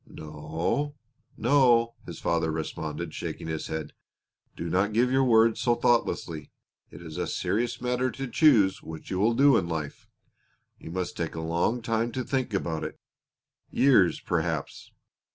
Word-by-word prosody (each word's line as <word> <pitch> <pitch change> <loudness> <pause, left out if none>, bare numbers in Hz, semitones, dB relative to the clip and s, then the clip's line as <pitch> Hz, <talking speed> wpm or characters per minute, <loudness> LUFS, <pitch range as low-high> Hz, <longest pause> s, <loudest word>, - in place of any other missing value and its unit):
"No, 80 - -3 0.4
no," 120 -2 +4
his - - -7
father 80 -1 0
responded, 80 0 -4
shaking - - -5
his 80 -1 -4
head. 80 -1 -5 0.6
"Do 85 - -5
not 95 +5 +1
give 125 +3 +2
your 135 +1 +3
word 115 -2 +4
so 120 -1 +2
thoughtlessly. 85 -11 0 0.4
It - - -12
is 80 -2 -8
a - - -1
serious 120 +3 -1
matter 125 +1 0
to 135 +3 -5
choose 115 -8 +4
what 80 -1 -9
you 95 - -1
will 115 +4 +3
do 135 -1 +6
in 85 - -1
life. 75 -3 -5 0.7
You - - -10
must 90 +1 -3
take 85 -2 -3
a - - -4
long 85 +9 0
time 115 +1 0
to 130 - -2
think 130 -2 -2
about 85 -5 -2
it - - -6 0.7
years, 120 -10 +4
perhaps. - - -3
105 Hz, 155 wpm, -27 LUFS, 80-120 Hz, 0.7 s, do